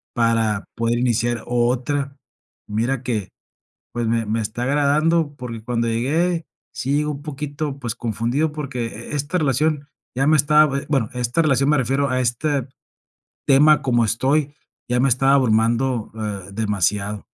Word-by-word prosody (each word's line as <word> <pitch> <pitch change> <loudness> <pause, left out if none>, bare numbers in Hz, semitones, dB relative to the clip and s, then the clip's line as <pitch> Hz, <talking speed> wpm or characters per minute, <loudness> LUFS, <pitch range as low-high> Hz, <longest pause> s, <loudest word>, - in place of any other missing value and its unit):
para 115 -3 +1
poder 115 +1 0
iniciar 120 -1 0
otra. 130 +4 0 0.5
Mira 115 +5 -1
que, 110 -6 -3 0.6
pues, 120 -1 -1
me 115 0 0
me 110 +2 0
está 110 +3 -4
agradando 145 +3 +2
porque, 115 -3 -7
cuando 115 0 -1
llegué, 160 +9 0 0.3
sí 125 +2 -3
llegue 150 +1 +1
un 145 -1 -4
poquito, 145 -1 -5
pues, 120 -4 -4
confundido 120 +7 -1
porque, 140 -6 -4
e 115 +6 -7
esta 145 +5 -1
relación 150 +1 0 0.3
ya 135 +2 +1
me 155 0 +5
está, 150 +2 +5
bue 140 0 -2
bueno, 135 -7 +1
esta 125 +5 0
relación, 135 -1 +2
me 150 - +4
refiero 135 +2 +1
a 130 - +1
este 135 +2 -1 0.8
tema 150 +2 +5
como 120 -3 +2
estoy 140 +6 +1 0.3
ya 125 0 +1
me 135 - +3
está 135 +2 +3
abrumando, 120 -1 +2
eh, 100 -3 -5
demasiado. 105 0 -1
130 Hz, 150 wpm, -21 LUFS, 115-145 Hz, 0.8 s, me